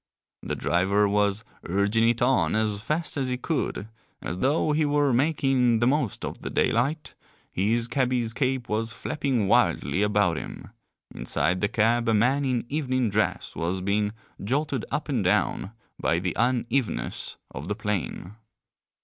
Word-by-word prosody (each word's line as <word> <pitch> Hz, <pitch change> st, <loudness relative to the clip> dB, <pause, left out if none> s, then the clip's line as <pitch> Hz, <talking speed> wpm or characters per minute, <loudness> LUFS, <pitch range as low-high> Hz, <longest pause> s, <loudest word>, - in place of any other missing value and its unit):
The -, -, -3 dB
driver 100 Hz, +4 st, +2 dB
was 100 Hz, +1 st, +1 dB, 0.2 s
urging 100 Hz, +5 st, +2 dB
it 120 Hz, 0 st, +1 dB
on 110 Hz, -11 st, +2 dB
as 110 Hz, -2 st, 0 dB
fast 155 Hz, +7 st, -2 dB
as 130 Hz, -2 st, 0 dB
he 125 Hz, -, -1 dB
could, 130 Hz, -6 st, -2 dB, 0.3 s
as 90 Hz, -, -5 dB
though 150 Hz, +5 st, +2 dB
he 155 Hz, +1 st, +2 dB
were 145 Hz, -2 st, +2 dB
making 130 Hz, -3 st, +2 dB
the 120 Hz, -, +2 dB
most 130 Hz, -4 st, 0 dB
of -, -, -6 dB
the -, -, -4 dB
daylight, 140 Hz, +7 st, 0 dB, 0.4 s
his 115 Hz, +5 st, +1 dB
cabby's 125 Hz, -2 st, 0 dB
cape 130 Hz, -1 st, -1 dB
was 110 Hz, +2 st, -1 dB
flapping 125 Hz, -3 st, -1 dB
wildly 95 Hz, -, +2 dB
about 105 Hz, -5 st, +2 dB
him; -, -, -7 dB, 0.4 s
inside 90 Hz, 0 st, -1 dB
the 100 Hz, -, +3 dB
cab 115 Hz, +1 st, +2 dB
a 110 Hz, -, +3 dB
man 130 Hz, +6 st, +2 dB
in 125 Hz, -3 st, 0 dB
evening 130 Hz, -6 st, 0 dB
dress 110 Hz, +2 st, -1 dB
was 85 Hz, +3 st, -1 dB
being 105 Hz, +2 st, 0 dB, 0.3 s
jolted 135 Hz, +2 st, -1 dB
up 150 Hz, -, -2 dB
and 130 Hz, -8 st, 0 dB
down 95 Hz, +2 st, +1 dB, 0.3 s
by 85 Hz, -, +1 dB
the 90 Hz, +1 st, -2 dB
unevenness 120 Hz, +1 st, -1 dB
of 70 Hz, +6 st, -7 dB
the 105 Hz, -, -2 dB
plain. 100 Hz, -, -3 dB
115 Hz, 155 wpm, -26 LUFS, 100-130 Hz, 0.4 s, the